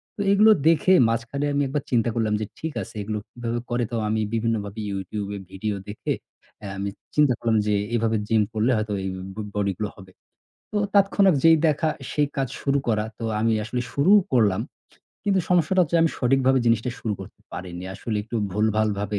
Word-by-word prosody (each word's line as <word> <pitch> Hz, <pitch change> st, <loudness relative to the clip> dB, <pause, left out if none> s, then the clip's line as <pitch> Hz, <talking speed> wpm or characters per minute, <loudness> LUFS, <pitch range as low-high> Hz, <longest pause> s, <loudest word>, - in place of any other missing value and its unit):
তো 205 Hz, -, -4 dB
এগুলো 215 Hz, +2 st, +6 dB, 0.2 s
দেখে 165 Hz, +3 st, +5 dB, 0.2 s
মাঝখানে 120 Hz, +5 st, -2 dB
আমি 140 Hz, -, +1 dB
একবার 140 Hz, +1 st, -2 dB
চিন্তা 120 Hz, -1 st, +2 dB
করলাম 110 Hz, -2 st, +1 dB
যে -, -, -1 dB
ঠিক 160 Hz, -1 st, -4 dB
আছে 115 Hz, -, -9 dB
এগুলো 105 Hz, +1 st, -3 dB
কিভাবে 120 Hz, 0 st, -3 dB
করে? 120 Hz, 0 st, 0 dB
তো -, -, -2 dB
আমি 110 Hz, +1 st, 0 dB
বিভিন্নভাবে 110 Hz, -2 st, -1 dB
YouTube 100 Hz, +1 st, -4 dB
এ -, -, -4 dB
video 105 Hz, +2 st, -3 dB
দেখে 105 Hz, -, -4 dB, 0.5 s
আ -, -, -4 dB
আমি 100 Hz, +1 st, -2 dB, 0.3 s
চিন্তা 150 Hz, -4 st, +4 dB
করলাম 115 Hz, -1 st, +1 dB
যে 105 Hz, -, +2 dB, 0.2 s
এভাবে 115 Hz, -1 st, +1 dB
gym 110 Hz, -1 st, +3 dB
করলে 110 Hz, +4 st, +2 dB
হয়তোবা 105 Hz, -2 st, -2 dB
এই 95 Hz, -, -1 dB, 0.3 s
ব -, -, -19 dB, 0.2 s
body 100 Hz, -1 st, 0 dB
গুলো 105 Hz, -2 st, -1 dB
হবে। 95 Hz, -1 st, -13 dB, 0.6 s
তো 210 Hz, -, -1 dB, 0.2 s
তাৎক্ষণিক 195 Hz, -3 st, +4 dB
যেই 165 Hz, 0 st, +7 dB
দেখা 155 Hz, +1 st, +1 dB, 0.2 s
সেই 145 Hz, -1 st, +1 dB
কাজ 135 Hz, -1 st, +1 dB
শুরু 140 Hz, 0 st, +1 dB
করা। 110 Hz, -2 st, +1 dB
তো 115 Hz, -, -5 dB, 0.2 s
আমি 115 Hz, +1 st, +2 dB
আসলে 125 Hz, +3 st, -2 dB
শুরুও 190 Hz, +9 st, +5 dB
করলাম। 105 Hz, -7 st, +3 dB, 0.6 s
কিন্তু 195 Hz, -2 st, +2 dB
সমস্যাটা 180 Hz, +1 st, +3 dB
হচ্ছে 170 Hz, 0 st, 0 dB
আমি 165 Hz, -, +3 dB
সঠিকভাবে 130 Hz, +1 st, +3 dB
জিনিসটা 115 Hz, +2 st, +2 dB
শুরু 110 Hz, -, -2 dB
করতে 95 Hz, -, -11 dB
পারিনি। 90 Hz, 0 st, -6 dB
আসলে 110 Hz, +2 st, -3 dB
একটু 115 Hz, +3 st, -5 dB, 0.2 s
ভুলভালভাবে 105 Hz, -1 st, 0 dB
115 Hz, 190 wpm, -24 LUFS, 105-145 Hz, 0.6 s, যেই